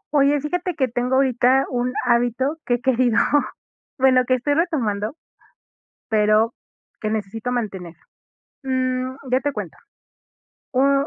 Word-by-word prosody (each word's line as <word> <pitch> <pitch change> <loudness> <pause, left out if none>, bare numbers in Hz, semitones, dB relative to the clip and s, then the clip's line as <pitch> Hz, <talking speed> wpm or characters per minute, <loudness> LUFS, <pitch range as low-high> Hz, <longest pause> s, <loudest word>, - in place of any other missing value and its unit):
Oye, 285 +1 +4
fíjate 355 +4 -2
que 265 -3 +1
tengo 245 +2 -1
ahorita 260 0 +3
un 245 0 -1
hábito 245 +5 +1
que 245 - +3
he 240 - -6
querido 250 -3 +2 0.8
bueno, 255 -1 +4
que 255 - +3
estoy 270 +4 0
retomando, 255 - -1 0.9
pero 215 +1 +3 0.5
que 215 - -2
necesito 220 +3 -3
mantener. 195 -8 -4 0.7
Mm, 255 -1 -1 0.2
ya 255 +1 +3
te 290 +1 -1
cuento. - - -6 0.9
Oh, 275 +2 +3
255 Hz, 125 wpm, -22 LUFS, 230-270 Hz, 0.9 s, Oye